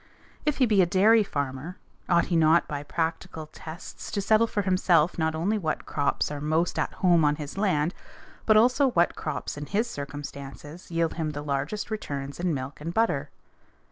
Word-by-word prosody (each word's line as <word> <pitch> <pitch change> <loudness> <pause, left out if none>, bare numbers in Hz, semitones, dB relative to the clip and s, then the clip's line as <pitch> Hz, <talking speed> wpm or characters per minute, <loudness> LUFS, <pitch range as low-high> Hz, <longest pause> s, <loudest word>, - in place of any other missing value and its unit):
If 300 - +2
he 260 - +4
be 210 -4 +4
a 180 - +3
dairy 210 +6 +5
farmer, 145 -2 -4 0.3
ought 170 -1 +4
he - - +3
not 165 +1 +4
by 145 -1 -4
practical 160 +1 -3
tests 160 +2 -9
to 205 - -2
settle 220 +3 +3
for 205 -2 -1
himself 180 -3 +2
not 160 0 +1
only 200 +7 0
what 160 -5 -2
crops 145 0 0
are 145 -1 -5
most 160 +3 0
at - - 0
home 170 -3 +5
on 150 0 +3
his 150 -1 -7
land 180 -5 +1 0.5
but 215 -1 +6
also 255 +5 +4
what 175 -7 +2
crops 150 -1 -4
in 145 0 -6
his 215 - 0
circumstances 145 - -8
yield 165 -1 0
him 155 -2 -3
the 145 0 -5
largest 145 +10 -3
returns 140 -9 -4
in 180 0 0
milk 135 0 -5
and 165 +3 -5
butter? 145 -11 +1
165 Hz, 185 wpm, -26 LUFS, 145-195 Hz, 0.5 s, but